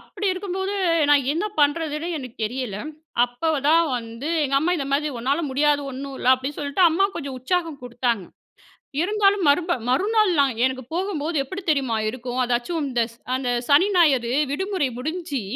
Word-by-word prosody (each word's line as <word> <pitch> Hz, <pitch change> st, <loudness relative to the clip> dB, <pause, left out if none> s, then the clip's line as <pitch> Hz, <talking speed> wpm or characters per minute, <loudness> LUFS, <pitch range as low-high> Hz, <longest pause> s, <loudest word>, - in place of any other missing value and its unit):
அப்டி 410 Hz, -, -6 dB
இருக்கும்போது 380 Hz, +1 st, -3 dB, 0.4 s
நான் 285 Hz, -3 st, +4 dB
என்ன 335 Hz, +6 st, -1 dB, 0.2 s
பண்றதுன்னு 300 Hz, +2 st, +1 dB
எனக்கு 250 Hz, -4 st, -9 dB
தெரியல. 240 Hz, -2 st, -3 dB, 0.5 s
அப்போதான் 305 Hz, +5 st, +2 dB
வந்து 230 Hz, +4 st, -6 dB, 0.2 s
எங்க 275 Hz, 0 st, +1 dB
அம்மா 345 Hz, +4 st, +1 dB
இந்த 280 Hz, -4 st, -3 dB
மாதிரி 295 Hz, +2 st, +1 dB
உன்னால 275 Hz, +7 st, 0 dB
முடியாத 290 Hz, +2 st, +2 dB
ஒண்ணும் 270 Hz, +1 st, -7 dB
இல்ல, 255 Hz, -, +2 dB
அப்டின்னு 265 Hz, +3 st, -6 dB
சொல்ட்டு, 285 Hz, +5 st, 0 dB
அம்மா 355 Hz, +5 st, +2 dB
கொஞ்சம் 275 Hz, -2 st, -5 dB
உற்சாகம் 325 Hz, +2 st, -2 dB
குடுத்தாங்க. 240 Hz, -4 st, -1 dB, 0.8 s
இருந்தாலும் 400 Hz, +1 st, +2 dB
மறுப 340 Hz, +5 st, +2 dB, 0.2 s
மறுநாள்லா 380 Hz, -, +3 dB, 0.2 s
எனக்கு 260 Hz, 0 st, -2 dB
போகம்போது 340 Hz, -4 st, -2 dB
எப்டி 375 Hz, +8 st, -7 dB
தெரியுமா 270 Hz, -6 st, +1 dB
இருக்கும்? 250 Hz, +1 st, -5 dB
அதாச்சும் 245 Hz, +7 st, -1 dB
இந்த 245 Hz, -3 st, 0 dB
ஸ் -, -, -22 dB, 0.2 s
அந்த 260 Hz, -1 st, -2 dB, 0.2 s
சனி 290 Hz, +7 st, +6 dB
ஞாயிறு 265 Hz, -9 st, +3 dB, 0.2 s
விடுமுறை 380 Hz, 0 st, -1 dB
முடிஞ்சி, 310 Hz, 0 st, -3 dB
285 Hz, 150 wpm, -23 LUFS, 255-345 Hz, 0.8 s, சனி